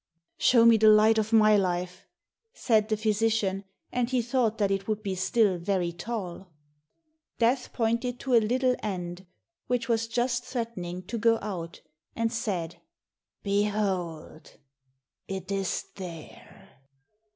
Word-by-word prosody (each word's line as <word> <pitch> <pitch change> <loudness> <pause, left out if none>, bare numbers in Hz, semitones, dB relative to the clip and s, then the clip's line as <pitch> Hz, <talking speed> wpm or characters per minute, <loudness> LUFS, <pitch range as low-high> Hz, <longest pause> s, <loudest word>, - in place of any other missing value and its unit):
"Show 235 -2 +5
me 230 -1 +7
the 215 0 +6
light 215 +1 +5
of 220 +1 -2
my 215 -1 +6
life," 180 -2 -2 0.5
said 220 - +1
the 215 - +1
physician, 215 -2 0 0.3
and 245 -1 0
he 255 -2 +1
thought 235 -2 0
that 200 -2 +1
it 195 0 -2
would 215 -1 -2
be 195 -2 -2
still 190 0 +1
very 180 -1 -1
tall. 190 -1 -6 0.9
Death 245 +2 +1
pointed 235 +1 -1
to 265 - -2
a 230 - +6
little 250 +3 +1
end 180 -2 -5 0.4
which 245 -2 -1
was 230 -1 0
just 240 +1 -1
threatening 190 -9 -5
to 230 +5 -5
go 230 0 +3
out, 175 -5 -6 0.3
and 230 0 -1
said, 180 -7 -3 0.7
"Behold, 200 -6 -2 0.7
it 190 0 -5
is 195 -2 -2
there." 170 -5 -10
215 Hz, 135 wpm, -27 LUFS, 190-230 Hz, 0.9 s, me